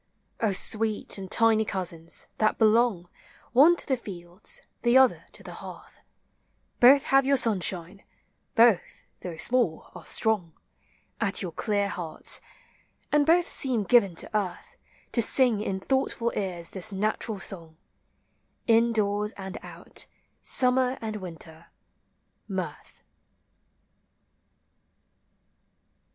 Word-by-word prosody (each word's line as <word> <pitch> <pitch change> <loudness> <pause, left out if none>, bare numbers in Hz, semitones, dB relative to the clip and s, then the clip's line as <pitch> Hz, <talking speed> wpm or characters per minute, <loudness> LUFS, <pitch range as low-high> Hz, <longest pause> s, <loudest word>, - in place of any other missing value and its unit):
O 220 -3 +1
sweet 215 +2 +2
and 190 -1 -8
tiny 225 0 +3
cousins, 175 -5 -5
that 215 0 +1
belong, 220 -5 +2 0.5
One 300 +8 +6
to - - -2
the 265 - 0
fields, 180 -4 -7 0.2
the 240 +1 +4
other 265 -1 +3
to - - -9
the - - -9
hearth, - - -12 0.8
Both 270 +3 +7
have 270 0 +3
your 275 +1 +2
sunshine; 190 -4 0 0.5
both, 230 -5 +3 0.2
though 175 -3 -7
small, 235 -6 0
are 180 -3 -11
strong 205 -7 +1 0.7
At 200 -3 +1
your 180 - -5
clear 205 +4 -1
hearts; 175 -4 -3 0.7
and 295 -1 +2
both 345 +2 +4
seem 250 -6 0
given 200 -4 +3
to - - -4
earth 190 -4 -4 0.4
To 235 - +1
sing 235 -2 +3
in 195 -3 -3
thoughtful 240 0 -1
ears 180 -4 -4
this 190 +1 -1
natural 210 +1 -2
song, 165 -5 -2 0.5
— - - -46
In 230 0 +3
doors 210 0 -1
and 190 -1 -8
out, - - -7 0.3
summer 255 0 +3
and 215 -1 -5
winter, 165 -3 -11 0.8
mirth. - - -7
210 Hz, 120 wpm, -26 LUFS, 185-240 Hz, 0.8 s, Both